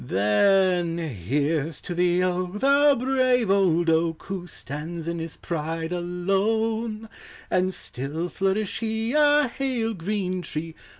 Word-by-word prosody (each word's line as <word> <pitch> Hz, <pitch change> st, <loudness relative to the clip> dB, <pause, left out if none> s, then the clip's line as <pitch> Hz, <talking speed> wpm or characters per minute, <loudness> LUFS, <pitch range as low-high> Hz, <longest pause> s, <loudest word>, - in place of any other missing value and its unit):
Then 170 Hz, -, +2 dB
here 145 Hz, -, -1 dB
\s 160 Hz, -3 st, -9 dB
to 175 Hz, -, -5 dB
the 175 Hz, +1 st, +2 dB
oak, 180 Hz, 0 st, -1 dB
the 280 Hz, +5 st, +4 dB
brave 255 Hz, -3 st, +2 dB
<>t<i 175 Hz, -4 st, +3 dB
oak, 165 Hz, 0 st, 0 dB
Who 190 Hz, -2 st, -5 dB
stands 160 Hz, +2 st, -6 dB
in 170 Hz, 0 st, -2 dB
his 165 Hz, -1 st, -6 dB
pride 165 Hz, 0 st, -3 dB
alone; 215 Hz, +6 st, -1 dB, 0.4 s
And 185 Hz, +1 st, +2 dB
still 150 Hz, +1 st, -5 dB
flourish 195 Hz, +1 st, -1 dB
he, 225 Hz, +1 st, -2 dB
a 295 Hz, -1 st, +4 dB
hale 240 Hz, -3 st, -2 dB
green 185 Hz, 0 st, -2 dB
tret 160 Hz, 0 st, -5 dB
180 Hz, 130 wpm, -25 LUFS, 165-220 Hz, 0.4 s, the